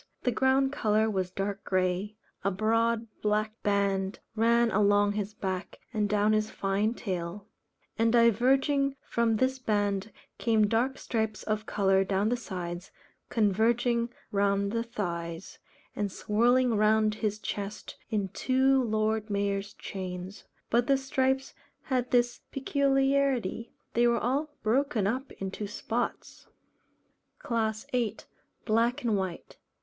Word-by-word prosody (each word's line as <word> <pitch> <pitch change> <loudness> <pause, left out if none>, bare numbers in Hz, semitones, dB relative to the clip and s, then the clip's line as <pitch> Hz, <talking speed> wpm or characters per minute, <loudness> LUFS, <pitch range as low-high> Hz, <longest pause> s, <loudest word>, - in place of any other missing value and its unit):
The 250 - +2
ground 265 +3 +2
colour 220 -4 +1
was 190 -3 -1
dark 195 +2 -3
grey; 185 +2 0 0.3
a 195 - +2
broad 225 +3 +1 0.2
black 215 +1 0
band 200 -1 0 0.2
ran 235 +1 +3
along 205 0 +3
his 205 0 -3
back 190 -2 -4 0.2
and 210 -2 0
down 210 +1 +3
his 215 0 +1
fine 205 +3 0
tail; 185 -2 -4 0.5
and 225 0 +4
diverging 265 +4 +3
from 230 -1 +1
this 260 +3 +1
band 205 -3 0 0.3
came 220 -2 +3
dark 235 +6 +1
stripes 220 -2 -2
of 215 0 -2
colour 195 -1 +3
down 195 +2 +1
the 245 - +2
sides, 180 -5 -6 0.4
converging 235 +3 +2 0.2
round 200 0 +1
the 230 +1 0
thighs, 170 -6 -5 0.4
and 205 -2 -2
swirling 240 +5 +2
round 215 0 +3
his 215 -1 -2
chest 205 -1 -5
in 205 -3 -1
two 265 +5 +2
Lord 215 -1 0
Mayor's 200 0 -1
chains; 185 +1 -7 0.3
but 235 +1 +3
the 275 -1 +4
stripes 265 0 0 0.3
had 250 -3 -1
this 240 -1 +2
peculiarity, 270 -5 +1 0.2
they 240 +1 +4
were 235 0 +3
all 270 +7 0
broken 240 -1 +1
up 255 +7 -2
into 195 +2 -5
spots. 230 +3 -4 0.9
CLASS 220 -2 -2
VIII. 235 -4 0 0.5
_Black 235 +5 +2
and 225 -3 +2
White. 190 -3 -4
215 Hz, 130 wpm, -29 LUFS, 200-240 Hz, 0.9 s, and